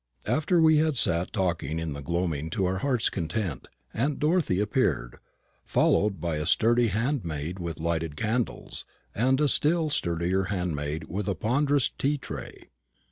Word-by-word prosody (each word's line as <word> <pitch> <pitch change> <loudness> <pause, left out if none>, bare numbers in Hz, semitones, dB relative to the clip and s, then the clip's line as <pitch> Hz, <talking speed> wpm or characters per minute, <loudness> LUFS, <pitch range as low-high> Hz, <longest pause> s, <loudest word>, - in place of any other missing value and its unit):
After 165 +3 +2
we 160 -1 +6
had 155 -2 +2
sat 85 -4 +2
talking 85 -6 -1
in 80 -2 -3
the 70 - -7
gloaming 80 0 -2
to 95 +3 -1
our 95 +1 0
hearts' 125 -1 +1
content, 85 - -3 0.3
aunt 135 +5 0
Dorothy 150 - +1
appeared, 105 - 0 0.4
followed 100 -3 +2
by 80 -1 -2
a 75 +1 -3
sturdy 120 +6 +3
handmaid 95 - -2
with 85 -2 -5
lighted 80 -2 -2
candles, 115 +5 -2 0.3
and 130 +5 +2
a 150 - +3
still 155 +3 +2
sturdier 90 - 0
handmaid 80 -6 -2
with 100 +3 -4
a 100 - 0
ponderous 140 - +2
tea 145 +2 -1
tray. - - -9
95 Hz, 150 wpm, -27 LUFS, 85-130 Hz, 0.4 s, we